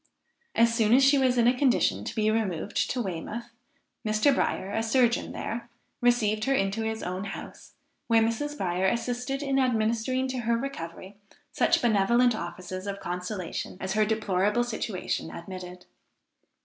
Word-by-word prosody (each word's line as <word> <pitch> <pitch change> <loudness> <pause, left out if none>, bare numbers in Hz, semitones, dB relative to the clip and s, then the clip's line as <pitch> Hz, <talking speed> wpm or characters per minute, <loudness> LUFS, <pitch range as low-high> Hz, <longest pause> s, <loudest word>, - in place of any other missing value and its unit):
As 230 0 +4
soon 230 0 +4
as 270 - +5
she 275 +1 +5
was 255 -2 +2
in 235 - +4
a 245 +2 +4
condition 245 - +2
to - - -5
be 215 0 +2
removed 205 -4 -1
to 255 - -1
Weymouth, 210 +6 -5 0.5
Mr. 215 +6 +3
Bryer, 195 -6 -1
a 225 - 0
surgeon 235 +1 +2
there, 235 +1 -5 0.3
received 220 -3 +2
her 275 0 +2
into 195 0 0
his 220 0 -3
own 185 +2 -3
house, 195 - -9 0.3
where 225 -1 +4
Mrs. 290 +7 -2
Bryer 185 -2 0
assisted 245 +5 -1
in 270 -1 +1
administering 245 +1 +1
to 255 -1 -3
her 235 0 +1
recovery 200 -6 -6 0.3
such - - +2
benevolent 235 +3 +4
offices 185 0 -6
of 200 0 -4
consolation 180 0 -4
as 190 0 -3
her 215 0 +3
deplorable 210 0 +1
situation 220 -8 -3
admitted. 180 0 -8
220 Hz, 155 wpm, -27 LUFS, 190-245 Hz, 0.5 s, as